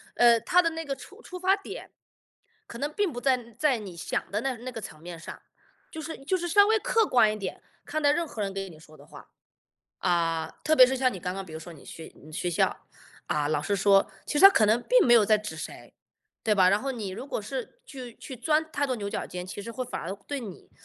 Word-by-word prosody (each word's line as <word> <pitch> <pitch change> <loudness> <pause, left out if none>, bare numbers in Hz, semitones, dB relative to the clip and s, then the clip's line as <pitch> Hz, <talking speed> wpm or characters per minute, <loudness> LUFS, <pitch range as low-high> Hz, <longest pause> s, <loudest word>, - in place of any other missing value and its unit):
呃， 235 -1 +6
他 350 +11 +3
的 330 - +1
那 325 0 -5
个 280 -3 -3
出 400 - -14
出 365 - -9
发 375 +2 +3
点， 395 - -9 0.7
可 235 - -10
能 290 +3 -2
并 390 -1 -1
不 245 - -6
在 265 -1 +3 0.2
在 295 -5 +3
你 200 -5 -8
想 170 - -3
的 210 +2 -1
那 265 -1 -2
那 250 +3 -7
个 230 -2 -7
层 155 - -9
面 170 0 -8
上， - - -9 0.5
就 315 - -6
是 320 +1 -6
就 375 - +1
是 350 -1 -2
稍 405 +4 +6
微 440 +1 +3
客 460 -1 +2
观 240 - +4
一 215 - -4
点， 200 - -6 0.2
看 310 - -2
待 290 -1 +5
任 335 +2 0
何 225 - -6
人 200 -1 -1
给 195 0 -4
你 160 -3 -14
说 155 0 -17
的 - - -16
话。 - - -14 0.7
啊， 165 -2 0
特 310 - +4
别 255 -4 +9
是 265 +1 -1
像 255 -1 +2
你 190 - -7
刚 180 +1 -3
刚 195 0 -5
比 170 - -12
如 160 - -6
说 165 +1 -10
你 150 - -15
学 160 - -10
你 155 +2 -15
学 175 +3 -2
校， 190 +2 0 0.4
啊， 150 -1 0
老 155 -1 +1
师 200 +7 -1
说， 195 0 +4
其 295 - -1
实 - - +2
他 390 - +12
可 220 - +3
能 215 +3 +3
并 - - +4
没 240 - +5
有 225 -3 +6
在 215 - +5
指 210 -5 -6
谁， 155 - -9 0.5
对 215 - +2
吧？ 185 -2 +5
然 200 +2 +2
后 275 - -3
你 220 -7 -4
如 195 +8 -7
果 250 - -3
是 260 - -6
去 255 -5 -9
去 265 - -9
钻 305 +6 +1
太 285 - 0
多 255 -2 -1
牛 200 -2 -4
角 - - -3
尖， 180 0 -6
其 185 - -7
实 230 - -7
会 255 +2 -4
反 250 - -5
而 170 - -5 0.2
对 285 -1 -3
你 205 -7 -10
235 Hz, 280 characters per minute, -27 LUFS, 195-295 Hz, 0.7 s, 他